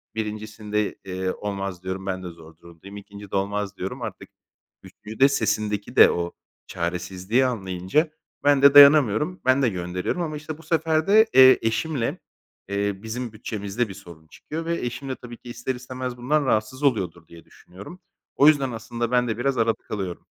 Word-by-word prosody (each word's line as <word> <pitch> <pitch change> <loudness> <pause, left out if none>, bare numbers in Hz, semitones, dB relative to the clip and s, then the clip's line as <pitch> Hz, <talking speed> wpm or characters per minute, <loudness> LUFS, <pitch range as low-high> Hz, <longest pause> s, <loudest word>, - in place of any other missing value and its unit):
1'incisinde, 105 -1 -3
eee, 95 0 -3
"olmaz" 100 -3 -5
diyorum 95 +1 -5
"ben 95 -1 -3
de - - -6
zor 80 -1 -15
durumdayım". 85 +4 -13
2'ncide 100 0 -9
"olmaz" 100 0 -2
diyorum. 125 +8 -5
Artık 110 -2 -7 0.5
3'üncüde 110 +6 0
sesindeki 105 -4 -1
de - - +8
o 85 0 -3 0.3
çaresizliği 90 +7 -1
anlayınca 100 - -1 0.3
ben 145 -1 +4
de 140 0 +7
dayanamıyorum, 145 - +6
ben 130 +1 +4
de 125 - +3
gönderiyorum 90 - -3
ama 155 -2 -3
işte 155 0 -7
bu 165 - -16
sefer 160 -1 0
de, 215 +3 +6
eee, 130 0 +8
eşimle, 115 +3 -1 0.5
eee, 100 0 -1
bizim 115 +1 -5
bütçemizde 105 +1 -3
bir - - -7
sorun 80 -4 -14
çıkıyor 160 - -7
ve 170 - -1
eşim 120 +3 -5
de 130 - -2
tabii 120 -1 -11
ki 120 - -13
ister 120 +2 -4
istemez 125 0 -6
bundan 140 +4 0
rahatsız 130 +4 -1
oluyordur 90 - 0
diye 85 0 -15
düşünüyorum. 100 - -13 0.4
O 145 - +5
yüzden 140 -4 +4
aslında 115 +1 -4
ben 125 -1 +2
de 110 - -2
biraz 130 +1 -1
arada 115 0 +2
kalıyorum. 95 -4 -5
110 Hz, 170 wpm, -24 LUFS, 95-130 Hz, 0.5 s, de